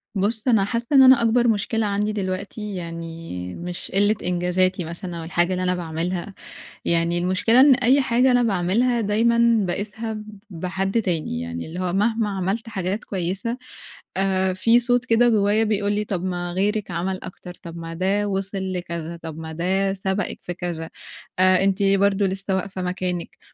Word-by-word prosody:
بُصّ 215 Hz, +5 st, -1 dB
أنا 225 Hz, -5 st, +4 dB
حاسّة 230 Hz, +3 st, -1 dB
إن 265 Hz, -, +9 dB
أنا 260 Hz, -2 st, +7 dB
أكبر 235 Hz, +1 st, +3 dB
مشكلة 220 Hz, +1 st, +1 dB
عندي 205 Hz, +1 st, 0 dB
دلوقتي 205 Hz, +1 st, -4 dB
يعني 165 Hz, -, -6 dB
مش 175 Hz, 0 st, -6 dB
قِلّة 205 Hz, +2 st, +3 dB
إنجازاتي 180 Hz, +1 st, +1 dB
مثلًا 170 Hz, +1 st, -6 dB
أو -, -, -6 dB
الحاجة 175 Hz, +2 st, 0 dB
اللي 185 Hz, 0 st, -2 dB
أنا 180 Hz, 0 st, +1 dB
باعملها، 175 Hz, +3 st, -3 dB, 0.5 s
يعني 170 Hz, 0 st, +1 dB
المشكلة 185 Hz, +7 st, +3 dB
إن 275 Hz, 0 st, +8 dB
أي 255 Hz, +2 st, +3 dB
حاجة 255 Hz, +1 st, +3 dB
أنا 245 Hz, -1 st, +4 dB
باعملها 225 Hz, +4 st, +1 dB
دايمًا 230 Hz, +2 st, +3 dB
باقيسها 210 Hz, +5 st, -3 dB
ب 215 Hz, -1 st, -9 dB
بحد 190 Hz, +5 st, -1 dB
تاني، 160 Hz, -, -2 dB
يعني 85 Hz, 0 st, -5 dB
اللي 170 Hz, +3 st, -6 dB
هو 180 Hz, -1 st, -1 dB
مهما 220 Hz, +3 st, +1 dB
عملت 195 Hz, +4 st, -2 dB
حاجات 195 Hz, 0 st, -3 dB
كويسة، 195 Hz, +5 st, -2 dB, 0.6 s
آآ 190 Hz, -1 st, +1 dB
في 230 Hz, +5 st, +4 dB
صوت 245 Hz, 0 st, +2 dB
كده 240 Hz, 0 st, +4 dB
جوايا 215 Hz, -1 st, +3 dB
بيقول 205 Hz, -1 st, 0 dB
لي 210 Hz, +1 st, 0 dB
طب 185 Hz, -3 st, -3 dB
ما 175 Hz, -1 st, -3 dB
غيرِك 205 Hz, +1 st, 0 dB
عمل 185 Hz, +2 st, -2 dB
أكتر، 180 Hz, -1 st, -9 dB
طب 170 Hz, -1 st, -8 dB
ما 165 Hz, 0 st, -6 dB
ده 195 Hz, +4 st, 0 dB
وِصل 195 Hz, -1 st, -3 dB
لكذا، 170 Hz, -2 st, -5 dB
طب 160 Hz, -1 st, -7 dB
ما 160 Hz, 0 st, -6 dB
ده 190 Hz, +4 st, 0 dB
سبقِك 190 Hz, 0 st, -2 dB
في 175 Hz, -, -5 dB
كذا، 170 Hz, -2 st, -5 dB, 0.5 s
آآ 185 Hz, 0 st, +5 dB
أنتِ 195 Hz, 0 st, +1 dB
برضه 195 Hz, 0 st, +3 dB
لسّه 190 Hz, 0 st, -1 dB
واقفة 190 Hz, 0 st, -4 dB
مكانِك، 180 Hz, -1 st, -3 dB
190 Hz, 170 wpm, -23 LUFS, 175-215 Hz, 0.6 s, إن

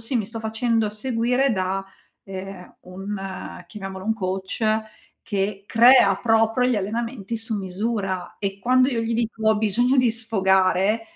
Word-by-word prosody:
sì, 245 Hz, +3 st, -1 dB
mi 220 Hz, -, 0 dB
sto 225 Hz, +2 st, -7 dB
facendo 220 Hz, 0 st, 0 dB
seguire 245 Hz, +4 st, 0 dB
da, 190 Hz, 0 st, -1 dB, 0.4 s
ehm, 190 Hz, -1 st, -9 dB
un 190 Hz, 0 st, -7 dB
chiamiamolo 195 Hz, -1 st, -8 dB
un 220 Hz, -, +1 dB
coach 190 Hz, +2 st, -3 dB, 0.6 s
che 200 Hz, 0 st, -2 dB
crea 230 Hz, -4 st, +6 dB
proprio 225 Hz, +2 st, +2 dB
gli 240 Hz, -, +1 dB
allenamenti 230 Hz, +2 st, -3 dB
su 225 Hz, 0 st, -4 dB
misura 195 Hz, -1 st, -3 dB
e 195 Hz, -1 st, -3 dB
quando 255 Hz, +5 st, +3 dB
io 240 Hz, -4 st, -1 dB
gli 225 Hz, +1 st, -2 dB
dico: 230 Hz, -1 st, -2 dB
“Ho 220 Hz, -1 st, +4 dB
bisogno 240 Hz, +5 st, +2 dB
di 250 Hz, -2 st, +4 dB
sfogare”, 195 Hz, -2 st, +2 dB
220 Hz, 145 wpm, -23 LUFS, 195-230 Hz, 0.6 s, crea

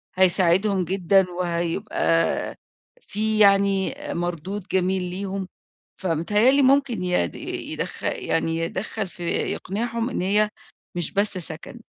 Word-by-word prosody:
هيساعدهم 185 Hz, +1 st, +3 dB
جدًا، 190 Hz, +1 st, +3 dB
وهيبقى 170 Hz, 0 st, 0 dB, 0.5 s
في 215 Hz, -, -2 dB
يعني 200 Hz, +1 st, +4 dB, 0.2 s
آآ، -, -, -2 dB
مردود 175 Hz, +3 st, -4 dB
جميل 190 Hz, 0 st, +1 dB
ليهم، 190 Hz, +1 st, -4 dB, 0.5 s
فمتهيأ 190 Hz, +7 st, +2 dB
لي 280 Hz, +1 st, +4 dB
ممكن 265 Hz, -6 st, +3 dB
يد 180 Hz, -, 0 dB
يدخ -, -, -4 dB
يعني 165 Hz, 0 st, -1 dB
يدخّل 190 Hz, +5 st, -3 dB
في 175 Hz, -1 st, -10 dB
يقنعهم 230 Hz, +7 st, -1 dB
إن -, -, -3 dB
هي 210 Hz, +3 st, +2 dB, 0.5 s
مش 175 Hz, -1 st, -2 dB
بس 200 Hz, -1 st, +2 dB
سكن. 170 Hz, +6 st, -1 dB
190 Hz, 115 wpm, -23 LUFS, 175-210 Hz, 0.5 s, يعني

